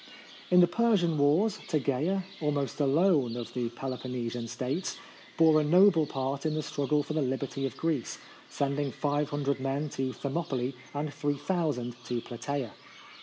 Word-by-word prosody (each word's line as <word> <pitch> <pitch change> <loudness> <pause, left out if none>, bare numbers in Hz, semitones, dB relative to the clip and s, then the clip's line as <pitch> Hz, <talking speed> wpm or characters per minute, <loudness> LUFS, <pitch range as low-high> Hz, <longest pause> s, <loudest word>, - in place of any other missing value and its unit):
In 180 0 +7
the 175 - +6
Persian 205 -8 +2
wars, 165 +9 +3
Tegea, 155 +6 0 0.2
almost 145 -2 -1
alone 145 -4 +3
of 120 - -6
the 120 -2 -1
Peloponnesian 125 -1 -4
States, 135 +10 -3 0.4
bore 160 -1 +6
a - - 0
noble 170 0 +5
part 135 +1 -2
in 155 -1 0
the 155 - -1
struggle 145 +1 0
for 150 - -5
the 155 - +1
liberty 135 +1 -1
of - - -9
Greece, 160 -7 -1 0.3
sending 140 0 -1
500 145 -1 -1
men 135 +3 -1
to 135 -1 -2
Thermopylae 135 -2 -2 0.2
and 145 0 -2
3000 145 -4 -1
to 120 -1 -1
Plataea. 125 +1 -4
145 Hz, 145 wpm, -29 LUFS, 130-155 Hz, 0.4 s, In